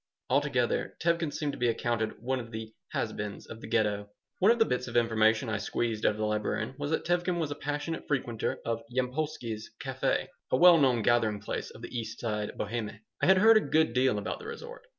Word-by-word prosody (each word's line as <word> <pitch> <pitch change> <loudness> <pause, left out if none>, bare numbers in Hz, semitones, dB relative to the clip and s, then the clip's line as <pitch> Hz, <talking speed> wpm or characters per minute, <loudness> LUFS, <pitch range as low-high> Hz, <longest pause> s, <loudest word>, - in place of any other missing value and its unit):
Altogether, - - +1
Tevkin 170 -2 +1
seemed 145 -1 -2
to - - -9
be 120 - +2
accounted 115 -1 -1
one 130 +1 0
of 115 -2 -7
the 110 -1 -6 0.2
"has - - -1
beens" 105 -1 -5
of 115 - -10
the - - -8
Ghetto 105 -2 0 0.3
One 195 - +5
of 235 - +3
the 225 - +5
bits 125 - -1
of 120 - -1
information 110 0 +3
I 110 -1 -1
squeezed 115 -1 -1
out - - +3
of - - -9
the 110 - -1
librarian 105 +4 -1
was 145 0 -2
that 160 - -1
Tevkin 175 0 +1
was 160 -4 -1
a - - -2
passionate 145 +3 -4
frequenter 120 -6 -1
of 115 0 -1
Yampolsky's 125 -3 -2
café, - - 0 0.2
a - - +3
well 175 +2 +8
known 125 -5 +3
gathering 110 -3 +2
place 105 - -4
of 115 - -13
the - - -7
East 115 -2 -4
Side 105 -3 -2
Bohème 110 0 -3 0.2
I - - +3
had 190 0 +7
heard 220 +3 +7
a - - +4
good 155 - +2
deal 125 -3 +3
about 105 - -3
the 440 - -9
resort. 475 +2 -9
120 Hz, 220 wpm, -29 LUFS, 110-155 Hz, 0.3 s, well